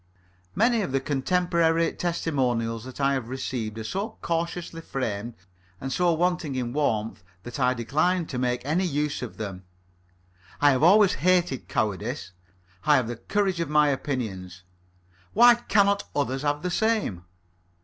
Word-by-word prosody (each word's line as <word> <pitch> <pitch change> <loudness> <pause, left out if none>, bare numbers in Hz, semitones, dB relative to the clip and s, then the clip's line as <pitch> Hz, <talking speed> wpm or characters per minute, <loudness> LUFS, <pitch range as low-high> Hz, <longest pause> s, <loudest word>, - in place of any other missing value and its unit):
Many 230 +3 +3
of 185 - -3
the 135 - +3
contemporary 165 +4 +1
testimonials 125 -9 -1
that 130 +1 -10
I 140 0 +2
have 130 -4 -3
received 120 -4 -4
are 110 - -5
so 200 - -4
cautiously 170 0 -3
framed 115 -6 -4 0.4
and 135 0 -4
so 180 -1 +2
wanting 175 -4 0
in 125 -2 -2
warmth 110 -9 -1 0.2
that 120 +3 -7
I 125 -1 +2
decline 155 +9 +1
to 130 -5 -5
make 125 0 -1
any 160 +6 +1
use 150 -3 -1
of 125 - -7
them. 95 -4 -5 1.0
I 145 0 +5
have 130 - +1
always 195 +4 +6
hated 175 -2 +1
cowardice. 105 +2 -2 0.5
I 150 - +5
have 125 -4 +2
the 120 - -4
courage 195 - -1
of 170 - -2
my 150 -1 +4
opinions. 100 -10 -4 0.7
Why 240 +3 +8
cannot 200 -4 +2
others 135 -2 -1
have 145 +1 -1
the 180 - -1
same. 210 - 0
145 Hz, 150 wpm, -26 LUFS, 120-175 Hz, 1.0 s, Why